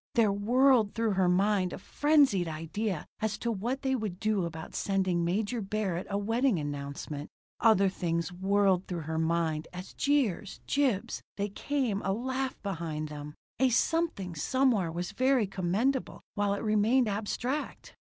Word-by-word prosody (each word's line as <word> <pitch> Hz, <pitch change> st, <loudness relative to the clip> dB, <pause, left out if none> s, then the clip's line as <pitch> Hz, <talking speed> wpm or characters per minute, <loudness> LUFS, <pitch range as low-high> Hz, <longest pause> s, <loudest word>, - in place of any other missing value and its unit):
There 225 Hz, -4 st, +4 dB
whirled 235 Hz, +1 st, +3 dB
through 225 Hz, -1 st, +1 dB
her 190 Hz, -2 st, +2 dB
mind 190 Hz, 0 st, +2 dB
a -, -, -5 dB
frenzied 285 Hz, -, +3 dB
idea 165 Hz, +4 st, -3 dB
as 215 Hz, -1 st, -1 dB
to 235 Hz, -, -2 dB
what 235 Hz, +7 st, -3 dB
they 265 Hz, 0 st, +1 dB
would 210 Hz, -7 st, -4 dB
do 215 Hz, -4 st, +1 dB
about 160 Hz, -1 st, -7 dB
sending 190 Hz, -3 st, 0 dB
Major 205 Hz, +7 st, -1 dB
Barrett 195 Hz, -3 st, -2 dB
a 200 Hz, -, 0 dB
wedding 225 Hz, +2 st, +1 dB
announcement. 145 Hz, 0 st, -5 dB, 0.3 s
Other 200 Hz, -3 st, +5 dB
things 170 Hz, -2 st, -1 dB
whirled 195 Hz, 0 st, +2 dB
through 175 Hz, -2 st, -3 dB
her 160 Hz, +1 st, -3 dB
mind 160 Hz, -1 st, 0 dB
as 180 Hz, +1 st, -8 dB
jeers, 230 Hz, -9 st, 0 dB
jibes, 265 Hz, -9 st, 0 dB, 0.2 s
they 205 Hz, +1 st, -1 dB
came, 240 Hz, -2 st, -1 dB
a 195 Hz, -, 0 dB
laugh 260 Hz, +4 st, -2 dB
behind 160 Hz, -5 st, -3 dB
them. 150 Hz, 0 st, -8 dB, 0.2 s
A 265 Hz, 0 st, +4 dB
something 250 Hz, -, 0 dB
somewhere 220 Hz, -, +1 dB
was 175 Hz, +2 st, -4 dB
very 255 Hz, -3 st, +2 dB
commendable 195 Hz, +8 st, -1 dB
while 205 Hz, -1 st, +1 dB
it 200 Hz, -, -5 dB
remained 220 Hz, +4 st, +3 dB
abstract! 225 Hz, +7 st, -3 dB
200 Hz, 150 wpm, -30 LUFS, 175-235 Hz, 0.3 s, Other